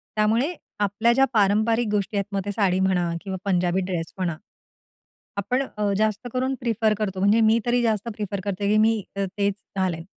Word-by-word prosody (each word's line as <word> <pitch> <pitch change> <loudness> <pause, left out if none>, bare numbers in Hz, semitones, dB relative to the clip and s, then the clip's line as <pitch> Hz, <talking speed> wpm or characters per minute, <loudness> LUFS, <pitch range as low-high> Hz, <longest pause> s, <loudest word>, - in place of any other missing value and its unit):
त्यामुळे 225 +9 +2 0.3
आपल्या 205 +4 +2
ज्या 270 +2 +4
पारंपारिक 220 +3 +3
गोष्टी 205 0 -1
आहेत, 200 - 0
मग 195 - +1
ते 205 - -2
साडी 195 -3 +1
म्हणा 185 -2 +1
किंवा 190 -2 -4
पंजाबी 180 -1 +1
ड्रेस 170 -3 -4
म्हणा. 175 -4 -1 1.0
आपण 215 +7 0
अ, 205 -1 0
जास्त 215 +2 0
करून 260 +1 0
प्रिफर 225 -2 +1
करतो. 195 -3 -2
म्हणजे 205 +4 +4
मी 220 +1 +4
तरी 240 0 +2
जास्त 220 -1 0
प्रिफर 205 -2 -3
करते, 200 0 -2
की 210 - +3
मी 220 0 +3
तेच 200 +1 -1 0.2
घालेल. 180 -4 -1
205 Hz, 175 wpm, -24 LUFS, 190-225 Hz, 1.0 s, ज्या